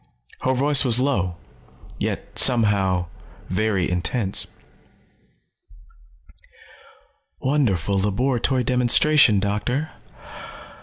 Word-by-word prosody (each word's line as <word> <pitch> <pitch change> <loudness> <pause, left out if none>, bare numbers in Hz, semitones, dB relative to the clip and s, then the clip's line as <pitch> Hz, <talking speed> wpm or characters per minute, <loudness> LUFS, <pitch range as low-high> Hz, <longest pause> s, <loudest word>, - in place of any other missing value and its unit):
Her 130 0 0
voice 140 +2 +3
was 125 -2 +3
low, 95 -10 -1 0.6
yet - - -5
somehow, 100 -7 +2 0.4
very 100 -1 -1
intense. 95 +4 -1 2.9
"Wonderful 100 - 0
laboratory 125 +5 -1
demonstration, 125 -1 +4
Doctor. 105 +9 -3
115 Hz, 65 wpm, -21 LUFS, 95-130 Hz, 2.9 s, demonstration